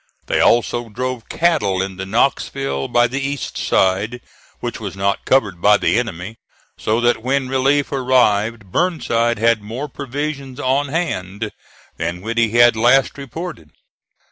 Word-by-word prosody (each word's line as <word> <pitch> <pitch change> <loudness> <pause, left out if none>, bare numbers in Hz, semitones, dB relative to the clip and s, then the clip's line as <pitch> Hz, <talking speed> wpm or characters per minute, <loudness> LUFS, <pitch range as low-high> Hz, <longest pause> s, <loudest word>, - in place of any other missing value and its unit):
They - - 0
also 120 0 +2
drove 125 +1 -4
cattle 105 - +1
into 95 0 -4
Knoxville 120 - 0
by 120 0 +3
the 130 +3 -2
east 140 0 -3
side, 100 +6 +1 0.4
which - - -4
was - - -6
not 100 +1 -1
covered 105 -10 +2
by 105 +1 +6
the 115 - +2
enemy; 110 -2 -5 0.4
so 110 +2 0
that 120 -1 +2
when 130 +2 0
relief 135 +2 +1
arrived 115 -6 +1
Burnside 120 - +1
had 115 0 +2
more 115 +8 -5
provisions 140 -1 -5
on 140 +1 +1
hand 110 - -3 0.5
than 85 +2 -3
when 115 +3 -4
he 115 -1 +3
had 120 +1 +5
last 125 +4 +3
reported. 140 - -7
120 Hz, 145 wpm, -19 LUFS, 105-135 Hz, 0.5 s, by